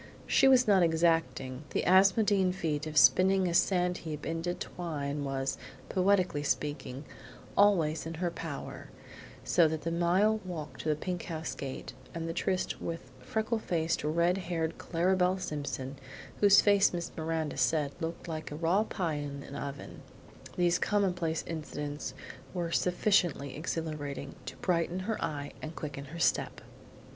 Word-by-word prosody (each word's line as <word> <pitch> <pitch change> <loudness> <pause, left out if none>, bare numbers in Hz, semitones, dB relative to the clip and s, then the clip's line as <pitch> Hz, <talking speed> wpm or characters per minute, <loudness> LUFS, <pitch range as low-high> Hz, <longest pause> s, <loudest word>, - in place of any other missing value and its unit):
She - - +4
was 255 -2 +6
not 195 -3 +5
exacting; 160 -5 +1
the - - -1
Asmodean 190 0 +4
feat 160 -5 -2
of 155 0 -4
spinning 190 +4 +6
a 170 - -1
sand 180 0 +2
heap 155 -2 -6
into 165 +2 -2
twine 145 -4 -4
was, 135 -1 -2 0.3
poetically 185 -5 +2
speaking, 145 -1 -2 0.5
always 165 -7 +3
in 165 - -5
her 175 +1 -1
power, 165 -4 -7 0.5
so 170 -2 +4
the 160 +1 -2
mile 185 +6 +3
walk 170 -5 -6
to 155 - -2
the 150 - +3
pink 180 +3 -4
house 160 -1 -4
gate, 135 -2 -6 0.2
and 165 0 -3
the 165 - -3
tryst 185 +1 -1
with 165 -6 -5
freckled, 220 - -1 0.4
red 170 +5 +2
haired 165 -3 -2
Clara 180 +2 +1
Belle 185 0 +2
Simpson, 145 -6 -4 0.4
whose 200 -1 +7
face 200 -1 +5
Miss 170 -1 -4
Miranda 160 -1 -2
said 150 -3 +2
looked 165 +1 -5
like 155 -2 -4
a 145 - -6
raw 170 +6 +2
pie 175 -7 -2
in 145 -1 -5
a - - -12
brick - - -5
oven, 140 0 -7 0.6
these 175 0 +3
commonplace 180 -6 0
incidents 150 -4 -5 0.4
were 170 -2 -2
sufficiently 175 -7 +1
exhilarating 150 -3 -4
to - - -5
brighten 175 0 0
her 215 +3 -2
eye 145 -1 -3
and 155 +1 -6
quicken 145 -2 -6
her 155 +5 -9
step. - - +1
165 Hz, 150 wpm, -31 LUFS, 150-185 Hz, 0.6 s, whose